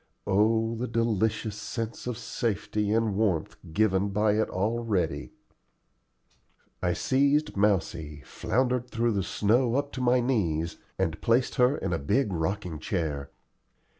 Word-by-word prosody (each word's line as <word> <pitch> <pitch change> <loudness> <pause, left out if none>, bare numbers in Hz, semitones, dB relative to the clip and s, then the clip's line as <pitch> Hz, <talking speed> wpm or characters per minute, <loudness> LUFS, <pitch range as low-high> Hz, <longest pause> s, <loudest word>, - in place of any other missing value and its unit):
Oh 110 +3 +2
the 120 +2 -3
delicious 110 -2 0
sense 115 +2 -5
of 125 -3 -2
safety 105 -3 -2
and 110 -2 +1
warmth 95 -7 0 0.2
given 100 +1 +2
by 105 +2 +2
it 110 +1 +1
already! 110 0 -1 1.5
I 90 -1 +1
seized 140 - +2
Mousie, 80 -7 0
floundered 125 +1 0
through 115 0 +1
the 100 -2 0
snow 115 +6 +2
up 140 +1 0
to 130 - -5
my 125 0 +4
knees, 85 -11 0 0.2
and 85 -4 -1
placed 120 +2 +2
her 125 +4 +4
in 95 -2 -2
a 85 - 0
big 100 - +1
rocking 85 -1 -2
chair. 75 -4 -2
110 Hz, 135 wpm, -28 LUFS, 95-120 Hz, 1.5 s, my